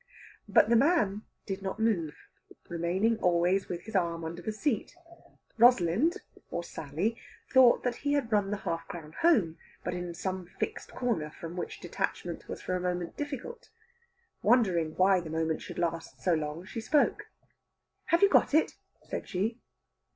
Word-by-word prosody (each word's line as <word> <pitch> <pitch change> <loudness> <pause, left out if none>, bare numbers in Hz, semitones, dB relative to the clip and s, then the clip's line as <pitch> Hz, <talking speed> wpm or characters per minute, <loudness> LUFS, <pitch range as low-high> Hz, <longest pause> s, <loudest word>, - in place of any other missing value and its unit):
But 205 +1 +5
the 235 - +5
man 230 - +3 0.2
did 195 -1 -4
not 190 +1 -4
move, 180 -9 +1 0.5
remaining 185 +7 0
always 180 +2 +2
with 175 -1 -4
his 220 0 -9
arm 170 -3 0
under 170 +2 -5
the 215 - -3
seat. 220 +5 -2 0.6
Rosalind, 240 - +5 0.3
or 170 - -3
Sally, 170 +8 -3 0.3
thought 255 -2 +6
he 285 0 -1
had 270 -5 0
run 205 -2 +2
the 205 - -1
half 165 -4 -4
crown 155 -3 -8
home, 215 - +3 0.2
but - - -2
in 175 -1 -5
some 185 0 -4
fixed 440 - -3
corner 220 -12 -1
from 165 +2 -8
which 180 - -5
detachment - - -4
was - - -6
for 185 - -1
a - - 0
moment 180 -1 -2
difficult. 290 - -6 0.7
Wondering 175 -10 +3
why 185 0 +4
the 170 -2 -7
moment 160 0 -1
should - - -8
last 165 -1 -2
so 180 - +2
long, 155 +2 -3
she 225 +3 -6
spoke. 295 +6 +1 0.8
"Have 335 +3 +3
you 400 - +7
got 290 - +4
it?" 315 - +2 0.3
said - - -5
she. 215 +4 -1
190 Hz, 160 wpm, -30 LUFS, 170-230 Hz, 0.8 s, you